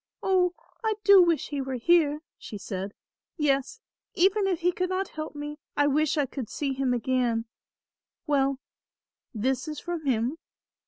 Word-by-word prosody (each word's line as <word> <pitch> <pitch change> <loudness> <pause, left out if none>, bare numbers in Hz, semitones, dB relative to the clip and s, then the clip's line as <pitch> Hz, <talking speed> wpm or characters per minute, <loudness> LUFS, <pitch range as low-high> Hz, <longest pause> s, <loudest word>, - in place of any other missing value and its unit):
"Oh! 360 -2 +2 0.3
I 440 -1 +1
do 400 -2 +8
wish 340 -3 +2
he 285 -2 -2
were 265 -1 -3
here," 300 +2 +3 0.2
she 210 - -7
said; 195 +1 -5 0.4
"yes, 295 - 0 0.3
even 390 +3 +3
if 360 -4 -1
he 355 +1 +3
could 365 +1 -2
not 375 0 -1
help 310 -1 -6
me 295 +1 -6 0.2
I 290 - +4
wish 300 +2 +2
I 290 - +3
could 255 -3 -6
see 280 -2 -2
him 265 -1 0
again; 245 -2 +1 0.8
well, 275 -3 +2 0.7
this 255 +4 -1
is 305 -2 -4
from 340 -4 -5
him." 250 +5 0
295 Hz, 160 wpm, -27 LUFS, 260-345 Hz, 0.8 s, do